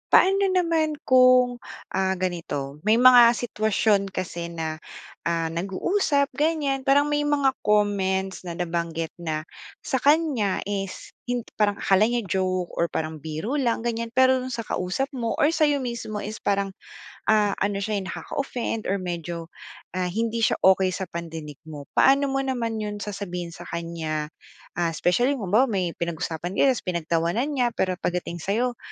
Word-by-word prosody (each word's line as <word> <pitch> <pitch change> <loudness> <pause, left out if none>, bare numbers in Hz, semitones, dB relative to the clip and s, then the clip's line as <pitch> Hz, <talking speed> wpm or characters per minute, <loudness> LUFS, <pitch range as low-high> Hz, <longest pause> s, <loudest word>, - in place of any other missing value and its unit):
Paano 390 +1 +5
naman 330 -4 +1
kung, 255 -1 +5 0.3
ah, 190 0 +1
ganito, 165 -6 -4
may 220 - +6
mga 245 -1 +8
sitwasyon 215 -3 +1
kasi 175 -2 -4
na, 160 -2 -4 0.5
ah, 165 -1 0
nag-uusap 280 - 0
ganyan, 290 -1 0
parang 285 +2 +4
may 295 0 +2
mga 285 -2 +3
comments 195 -2 +1
na 170 - -4
nabanggit 170 -2 -2
na 155 -2 -3 0.4
sa 260 - 0
kanya 285 - +2
is 195 -1 -5
hin 245 0 -1 0.2
parang 210 -1 +3
akala 195 +2 +4
niya 240 +1 0
joke 185 -1 0
or 170 - +3
parang 160 -1 -3
biro 160 - -3
lang 240 -5 0
ganyan, 230 0 -3
pero 260 +1 +5
do'n 255 0 -5
sa 235 - -2
kausap 190 +8 -2
mo 240 -5 -2
or 295 - +5
sa’yo 295 -4 +2
mismo 230 -3 -4
is 215 +2 -5
parang, 200 -1 0 0.6
ah, 210 -2 +4
ano 200 0 0
siya, 215 +1 -1
eh, 190 - -6
nakaka-offend 230 +2 -4
or 195 - +1
medyo, 170 -2 -5 0.5
ah, 180 -1 0
hindi 225 +5 -1
siya - - +2
okey 190 -1 +4
sa 190 - -5
pandinig 160 -4 -6
mo. 150 -2 -8
Paano 275 +1 +5
mo 270 - 0
naman 240 -4 -2
'yon 210 -1 -4
sasabihin 185 -4 -5
sa 170 +1 -11
kanya, 160 -3 -4 0.5
ah, 170 -1 0
especially, 240 - +2
kung 215 -9 -4
halimbawa 225 +7 +5
may 190 -8 -1
pinag-usapan 170 +1 -3
kayo 275 - +4
tapos 250 - -4
pinagtawanan 170 - 0
niya 250 -5 0
pero 185 -1 -1
pagdating 175 -1 -3
sa’yo, 230 +8 -1
205 Hz, 160 wpm, -25 LUFS, 175-250 Hz, 0.6 s, mga